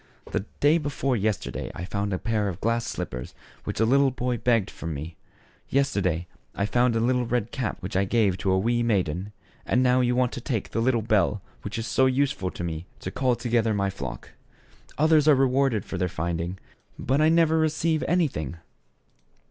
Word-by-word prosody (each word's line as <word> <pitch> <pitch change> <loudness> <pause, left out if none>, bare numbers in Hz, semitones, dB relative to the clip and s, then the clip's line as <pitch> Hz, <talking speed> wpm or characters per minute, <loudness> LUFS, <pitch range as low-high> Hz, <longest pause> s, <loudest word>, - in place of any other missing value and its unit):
The 95 - -1
day 150 +4 +4
before 140 -3 -1
yesterday 105 -2 -2
I 90 - -5
found 100 +2 -2
a 95 - 0
pair 110 0 -1
of 95 -2 -4
glass 115 +2 0
slippers 60 0 -5 0.3
which - - -4
a 110 - +4
little 135 +3 +4
boy 125 -1 -2
begged 115 -5 +1
from 80 -2 -5
me; 80 +4 -6 0.5
yesterday, 100 - +1 0.3
I 100 - 0
found 120 +2 +2
a - - +2
tiny 125 +2 +2
red 120 -2 -1
cap 130 -7 -3
which 90 0 -6
I 95 +1 +3
gave 105 -2 +2
to 95 - 0
a 95 - +3
wee 120 +5 +1
maiden; 95 -4 0 0.3
and 125 +2 +2
now 125 0 +4
you 125 0 +2
want 125 -1 +2
to 125 - -6
take 115 -4 -3
the 115 - 0
little 120 -2 +2
bell 105 -2 +1 0.2
which 105 +3 -5
is 115 - -3
so 130 +2 +3
useful 130 -7 0
to 90 - -7
me 85 0 -4
to 95 - -5
call 130 +1 +1
together 115 -3 +1
my 100 -1 0
flock. 65 -10 -7 0.7
Others 155 0 +4
are 150 - +7
rewarded 130 -4 +2
for 95 - -5
their 90 0 0
finding, 85 +2 -3 0.4
but 135 +4 +1
I 155 - +5
never 160 -1 +4
re 160 0 +3
ceive 160 +1 0
anything." 130 - 0
115 Hz, 195 wpm, -26 LUFS, 95-130 Hz, 0.7 s, are